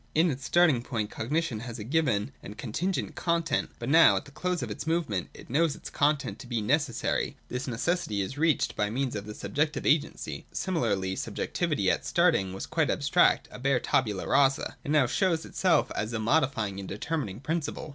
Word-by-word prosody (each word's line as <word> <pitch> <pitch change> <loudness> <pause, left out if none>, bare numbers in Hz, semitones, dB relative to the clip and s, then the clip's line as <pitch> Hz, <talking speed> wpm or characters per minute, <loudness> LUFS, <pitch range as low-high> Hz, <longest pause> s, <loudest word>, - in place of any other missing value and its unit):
In 160 +2 +4
its 130 -1 -6
starting 160 -5 +4
point 110 -4 -3
cognition 135 0 -1
had 115 0 -6
a 105 - -6
given 130 -5 +1
and 100 - -8
a - - -23
con 110 0 -6
tingent 185 +6 -1
content; 170 -1 0
but - - -6
now, 160 +4 +7
at - - -2
the 145 - -13
close 180 +3 -2
of - - -5
its - - -6
movement, 160 - -1
it - - -13
knows 150 +3 +2
its - - -9
content 145 -1 +1
to - - -10
be 120 -2 -1
necessary. 135 +3 0
This 125 +2 -4
necessity 125 - -1
is 95 +7 -4
reached 155 0 +1
by 105 0 0
means 130 +3 -2
of 105 0 -5
subjective 150 +1 -1
agency. 150 0 0
Similarly, 100 - -1
subjectivity - - -1
at - - -1
starting 95 -1 +2
was 95 - -5
quite - - 0
abstract, - - +3
a - - -9
bare 135 0 +2
tabula 105 -8 0
rasa. 135 -1 +2
It - - -6
now 150 -3 +4
shows 165 +5 +1
itself 185 -2 +2
as 110 +2 -2
a 115 - -1
modifying 115 -5 +1
and 95 - -7
determining 110 -2 -3
principle. 155 +2 -3
135 Hz, 195 wpm, -28 LUFS, 110-160 Hz, -, now